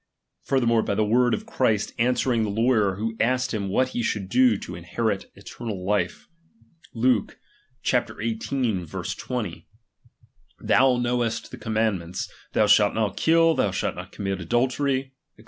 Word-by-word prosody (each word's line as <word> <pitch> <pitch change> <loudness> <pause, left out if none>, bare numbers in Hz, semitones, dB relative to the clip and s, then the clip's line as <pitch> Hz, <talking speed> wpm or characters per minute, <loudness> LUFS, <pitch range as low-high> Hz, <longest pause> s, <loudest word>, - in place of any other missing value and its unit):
Furthermore, 115 -4 +2
by 100 - -1
the 110 +1 +2
words 120 +3 +3
of 215 - -10
Christ, 110 - 0
answering 125 0 +2
the 110 - 0
lawyer 110 -2 +2
who 110 +3 -3
asked 125 +2 +1
him 100 -3 -2
what 130 +6 +1
he 120 - -3
should 105 -4 -2
do 125 -1 +4
to 90 - -8
inherit 95 +4 -2
eternal 105 -6 -7
life 105 +1 -1 0.7
(Luke 115 -2 +1 0.5
xviii. 115 +1 0
20): 115 -6 -1
T/lou 100 +4 -5 1.0
Imowest 120 -2 +2
the - - -8
commandments: 105 -6 -1 0.3
Thou 110 - +4
shall 105 0 +5
not 105 -3 -1
kill, 165 0 +4
thou - - +1
shalt - - -2
not - - -9
commit 95 -2 -3
adultery, 130 - 0 0.2
&c. - - -26
115 Hz, 145 wpm, -25 LUFS, 100-125 Hz, 1.0 s, shall